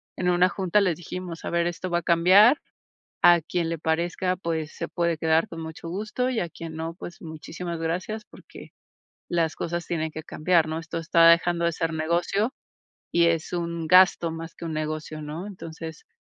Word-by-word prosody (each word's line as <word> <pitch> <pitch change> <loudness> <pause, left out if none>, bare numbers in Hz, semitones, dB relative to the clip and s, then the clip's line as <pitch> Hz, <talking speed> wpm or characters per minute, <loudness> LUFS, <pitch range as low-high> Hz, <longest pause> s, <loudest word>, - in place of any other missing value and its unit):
en 180 -1 0
una 180 +1 +4
junta 190 +2 +1
les 185 -5 +2
dijimos: 175 -1 -7
"A - - -3
ver, 170 0 +1
esto 175 +2 -4
va 175 - +1
a - - -9
cambiar, 190 - +6 0.7
a 175 -1 +7
quien 165 +1 -2
le 165 - -3
parezca, 175 +3 0
pues, 160 -3 -3
se 170 - -3
puede 170 -2 0
quedar 160 +1 +2
con 165 -1 -8
mucho 160 +1 -8
gusto, 215 +7 -2
y 245 -3 0
a 175 - -2
quien 160 -1 -8
no, 165 +1 -4
pues 180 +4 -10
muchísimas 165 +2 -6
gracias 185 +7 -3
porque - - -14 0.6
las 165 -4 0
cosas 170 +1 -3
tienen 160 -2 -2
que 160 - -6
cambiar", 160 +1 +1
¿no? 160 +1 -2
"Esto 165 0 -5
está 165 0 +5
dejando 170 0 +3
de 170 - +2
ser 165 0 -2
negocio 170 +8 0 0.6
y 170 0 +4
es 165 0 0
un 170 -2 -3
gasto 180 -1 +5
más 165 0 -7
que - - -8
un 160 - -3
negocio", 155 0 -4
¿no? 155 +6 -6
Entonces, 165 -4 -9
170 Hz, 195 wpm, -25 LUFS, 160-180 Hz, 0.7 s, a